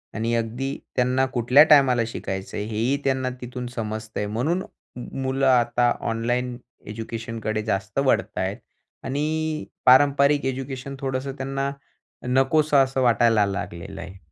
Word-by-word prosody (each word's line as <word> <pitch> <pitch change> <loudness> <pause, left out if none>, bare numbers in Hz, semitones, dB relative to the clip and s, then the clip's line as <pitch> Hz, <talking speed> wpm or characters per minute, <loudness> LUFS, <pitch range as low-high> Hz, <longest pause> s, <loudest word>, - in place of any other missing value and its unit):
आणि 115 +1 -1
अगदी 120 +4 -2 0.2
त्यांना 125 +1 +2
कुठल्या 125 +5 +6
टायमाला 130 -5 +6
शिकायचं 95 -4 -5
आहे, 105 - -3
हेही 115 +5 0
त्यांना 130 -1 0
तिथून 125 0 -6
समजतंय. 110 -1 -4
म्हणून 145 - -1 0.6
मुलं 135 +1 0
आता 120 -1 +3 0.2
ऑनलाईन 120 +2 -1 0.3
एज्युकेशनकडे 110 0 -4
जास्त 105 +2 -2
वळत 130 - +1
आहेत - - -1 0.5
आणि 155 +3 -2 0.2
पारंपरिक 140 +2 +5
एज्युकेशन 135 +1 -4
थोडंसं 135 0 -3
त्यांना 135 +1 -2 0.6
नकोसं 140 +4 +3
असं 130 0 -2
वाटायला 115 -3 +4
लागलेलं 95 -4 -5
आहे. 90 +2 -10
125 Hz, 120 wpm, -24 LUFS, 115-135 Hz, 0.6 s, कुठल्या